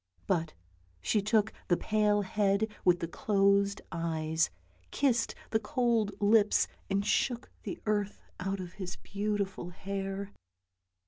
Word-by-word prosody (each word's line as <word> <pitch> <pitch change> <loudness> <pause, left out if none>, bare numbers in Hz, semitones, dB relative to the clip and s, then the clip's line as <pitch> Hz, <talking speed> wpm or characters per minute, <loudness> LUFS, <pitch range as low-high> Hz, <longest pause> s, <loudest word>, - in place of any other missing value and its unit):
But 165 -5 0 0.4
she 200 - +1
took 215 +1 +2
the 175 - +3
pale 210 -1 +2
head 200 +2 +2 0.2
with 175 -1 +4
the 165 - -1
closed 200 +1 +2
eyes, 160 -1 0 0.4
kissed 245 -5 +1 0.2
the 220 - +3
cold 230 -3 0
lips 210 0 +4 0.2
and 200 0 +1
shook 245 +2 0
the 345 - -5
earth 205 -1 0 0.2
out 195 +2 -2
of 180 -1 -6
his 185 -2 -5
beautiful 200 -3 -3
hair. 195 +2 -4
200 Hz, 125 wpm, -31 LUFS, 185-215 Hz, 0.4 s, with